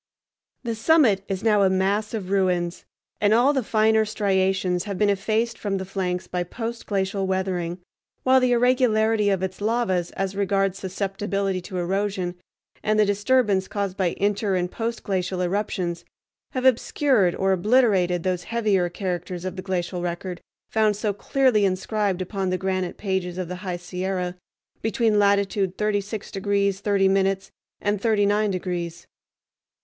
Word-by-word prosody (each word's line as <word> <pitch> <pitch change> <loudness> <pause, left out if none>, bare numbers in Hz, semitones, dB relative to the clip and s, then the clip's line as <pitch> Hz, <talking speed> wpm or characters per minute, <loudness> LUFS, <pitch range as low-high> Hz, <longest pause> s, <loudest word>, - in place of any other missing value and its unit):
The 235 -2 -2
summit 225 -4 +3
is 195 +1 -3
now 210 -2 +4
a 195 - +5
mass 200 +4 0
of 195 -3 -5
ruins, 180 -3 0 0.4
and 210 +1 +4
all 255 +5 +4
the 265 - +1
finer 220 -1 +3
striations 190 -3 0
have 200 -2 -4
been 205 0 +3
effaced 220 +4 -1
from 200 -2 -1
the 190 - -4
flanks 180 -1 -2
by 180 - -3
post 230 +6 -5
glacial 195 -1 -1
weathering, 185 -2 -1 0.5
while 260 0 +5
the 255 -1 +2
irregularity 225 -4 +3
of 190 -2 0
its 190 +1 -4
lavas 210 -6 0
as 195 0 -2
regards 195 -1 0
susceptibility 195 0 -2
to 180 +1 -7
erosion, 190 0 -1 0.5
and 215 0 +1
the 210 - +5
disturbance 205 -1 +2
caused 200 -2 -3
by 185 -3 0
inter 200 0 +1
and 180 0 -1
post 230 0 -3
glacial 185 -1 -2
eruptions, 180 -2 -2 0.5
have 255 -1 -2
obscured 250 -5 +3
or 195 0 +1
obliterated 190 -4 +3
those 180 -1 -1
heavier 210 -6 +1
characters 180 -1 -4
of 185 -1 -4
the 185 - -5
glacial 180 -1 -2
record 175 +1 -4 0.3
found 215 -1 +3
so 210 0 -1
clearly 250 +1 +2
inscribed 195 0 0
upon 190 0 -3
the 185 - 0
granite 185 -1 -2
pages 190 -3 -2
of 185 -2 -3
the 180 +1 -5
high 180 -1 -4
Sierra 180 0 -3 0.5
between 220 -1 +2
latitude 200 -2 +2
36 210 0 -2
degrees 200 0 0
30 200 -1 +2
minutes 195 0 +1 0.3
and 205 -1 -1
39 210 -1 +2
degrees. 175 -3 -4
195 Hz, 155 wpm, -24 LUFS, 185-215 Hz, 0.5 s, a